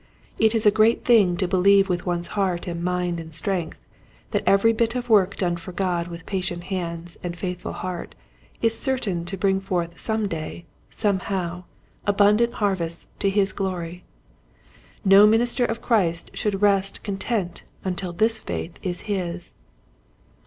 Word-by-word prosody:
It 220 +1 +4
is 220 - +1
a 210 - +7
great 220 +2 +3
thing 205 -8 +5
to 185 -1 0
believe 195 +2 +4
with 180 -1 -2
one's 175 -1 -1
heart 190 -4 -1
and 170 -2 -4
mind 180 -1 -1
and 160 -1 -8
strength 180 -3 -2 0.5
that - - +1
every 200 +4 +5
bit 230 +1 0
of 245 -1 -3
work 200 -2 +4
done 175 -2 -1
for 170 +2 -9
God 175 -2 -1
with 170 -1 -9
patient 185 -3 -3
hands 170 -2 -4
and 175 -1 -5
faithful 180 0 -4
heart 180 -1 -5 0.5
is 225 0 +2
certain 210 -11 -1
to 195 +3 -4
bring 190 0 +2
forth 175 -3 -2
some 220 -2 +1
day, 170 0 -6 0.2
somehow, 185 -4 -1 0.4
abundant 210 +3 +4
harvests 180 -5 -2
to 195 - +2
his 195 0 +2
glory. 180 -3 -4 1.0
No 195 +2 +8
minister 240 +3 +3
of 230 0 -3
Christ 175 -8 +1
should 205 -3 -2
rest 195 -1 +2
content 200 -2 -2 0.2
until 185 -1 -3
this 220 +5 +1
faith 165 -4 -5
is 180 -2 -3
his. 180 -4 -4
190 Hz, 155 wpm, -24 LUFS, 175-210 Hz, 1.0 s, No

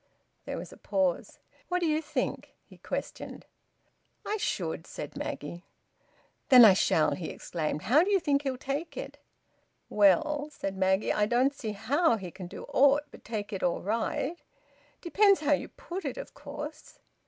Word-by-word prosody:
There - - -4
was - - -8
a - - -14
pause. 190 -3 -1 0.3
"What 360 0 0
d'ye 315 -2 +1
think?" 295 -4 -3
he - - -17
questioned. - - -6 0.8
"I 425 - -1
should," 165 - -3
said 150 - -7
Maggie. 170 +5 -5 0.9
"Then 250 -3 +10
I 205 - +9
shall!" 160 -4 +3
he 170 - -4
exclaimed. 155 -3 -4
"How 285 +9 +5
d'ye 400 +1 +3
think 285 -6 +1
he'll 270 -3 -2
take 275 +6 -4
it?" - - -7 0.7
"Well," 295 +9 +3
said 195 -9 -4
Maggie, 190 +1 +2
"I 210 0 +2
don't 255 +5 +2
see 220 -6 -5
how 240 - +2
he 185 -4 -7
can 190 0 -8
do - - -9
aught 285 +2 +4
but - - -14
take 215 -2 -5
it 195 - -4
all 175 -1 0
right... 230 - -1 0.6
Depends 395 +2 +4
how 295 -1 +3
you 285 - -1
put 360 +2 -7
it, 275 -4 -4
of - - -8
course." 300 +1 -8
255 Hz, 165 wpm, -29 LUFS, 195-305 Hz, 0.9 s, Then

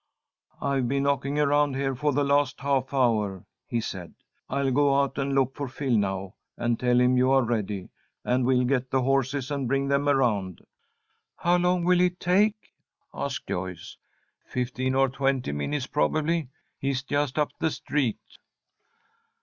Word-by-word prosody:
"I've 135 -3 0
been 140 +2 0
knocking 140 0 0
around 145 -1 +2
here 135 0 -1
for 145 +4 0
the 145 +1 +1
last 140 -1 +1
half 135 -2 0
hour," 110 -8 +1 0.2
he 120 - -1
said. 95 -6 -6 0.3
"I'll 140 0 0
go 140 +1 +3
out 140 0 -1
and 135 0 -1
look 135 -1 +2
for 140 -1 -4
Phil 130 -1 -1
now, 95 -2 -1 0.2
and 120 -1 0
tell 125 0 +3
him 125 0 +4
you 130 +1 +3
are 135 -1 +4
ready, 105 -5 -2 0.4
and 125 +1 +1
we'll 125 0 +3
get 130 0 0
the 130 0 +1
horses 135 +1 0
and 140 -3 -1
bring 135 +2 0
them 140 +1 +2
around." 105 - 0 0.7
"How 175 +1 +2
long 180 0 +2
will 180 0 +4
it 180 0 +1
take?" 205 +4 +1 0.4
asked - - -4
Joyce. 90 -1 -5 0.5
"Fifteen 125 +1 -2
or 135 0 +4
twenty 135 - -1
minutes, 75 0 -2
probably. 155 - 0 0.3
He's 135 -1 -1
just 145 -1 -1
up 150 -1 +1
the 160 - +1
street." 140 -7 -1
135 Hz, 160 wpm, -26 LUFS, 125-140 Hz, 0.7 s, him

